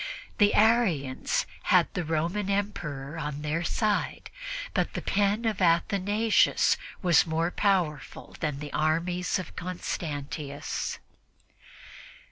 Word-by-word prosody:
The 205 -1 +5
Arians 200 - +2 0.2
had - - +5
the 180 - -2
Roman 170 +6 -1
Emperor 160 -8 -3
on 150 -1 -4
their 155 +3 -1
side, 210 +5 -1 0.4
but - - 0
the - - -2
pen 205 +3 +1
of 215 -3 -1
Athanasius 200 +5 +3 0.3
was 175 -1 +5
more 165 +2 0
powerful 180 -9 -1
than 150 -3 -2
the 145 0 -7
armies 170 +4 0
of 185 - -7
Constantius. 150 -4 -4
170 Hz, 105 wpm, -28 LUFS, 150-200 Hz, 0.4 s, The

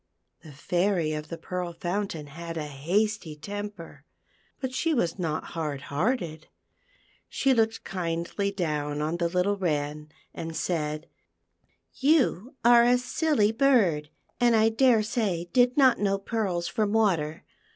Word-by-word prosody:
The 155 - -12
Fairy 175 +2 0
of 150 0 -5
the 170 - -5
Pearl 180 +1 -4
Fountain 175 -2 -3
had 165 +3 -7
a 155 - -3
hasty 170 +5 -1
temper, 205 +2 -7 0.6
but 260 -2 -4
she 320 +4 +1
was 175 -6 0
not 160 -3 -2
hard 150 -5 -3
hearted; 170 - -1 0.8
she 270 -1 +2
looked 225 -2 +1
kindly 170 +2 -2
down 150 -5 -2
on 155 +3 -1
the 170 -1 0
little 180 +3 +1
8 200 - -7
THE 190 - -3
PEARL 155 - +2
FOUNTAIN. 145 +1 -4
Wren, 150 0 -15 0.2
and 165 0 -6
said, 155 -3 -2 0.9
"You 270 - +2
are 240 0 +7
a 245 +1 +5
silly 250 -3 +1
bird, 220 - +3 0.3
and 240 -1 +4
I 220 0 +5
daresay 220 -6 +2
did 250 +1 +4
not 260 -4 +5
know 195 -1 +1
pearls 195 -4 -2
from 210 -1 -1
water. 170 -9 +1
180 Hz, 150 wpm, -27 LUFS, 160-225 Hz, 0.9 s, are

